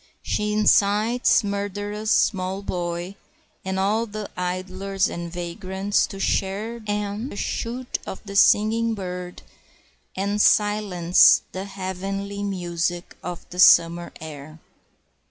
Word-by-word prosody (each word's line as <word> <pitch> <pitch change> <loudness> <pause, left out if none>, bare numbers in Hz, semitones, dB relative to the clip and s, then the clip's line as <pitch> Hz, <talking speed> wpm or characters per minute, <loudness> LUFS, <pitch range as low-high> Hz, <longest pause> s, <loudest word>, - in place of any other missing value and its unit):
She 210 0 -1
incites 215 +3 +3
the 205 - -5
murderous 205 +1 -3
small 190 -3 +1
boy 175 0 -3 0.5
and 190 0 -3
all 215 +4 +1
the 210 -1 -7
idlers 185 +2 -2
and 170 0 -6
vagrants 190 +3 -1
to 195 - -9
share 205 +5 -1
and 205 +2 -3
shoot 245 +4 -3
the 200 +1 -8
singing 225 +3 +4
bird, 180 -2 -6 0.7
and 200 +2 0
silence 205 -5 +4
the 190 +1 -5
heavenly 195 +1 -5
music 175 -3 -3
of 175 -1 -7
the 180 - -7
summer 170 -1 +5
air. 155 0 -9
195 Hz, 110 wpm, -23 LUFS, 180-210 Hz, 0.7 s, summer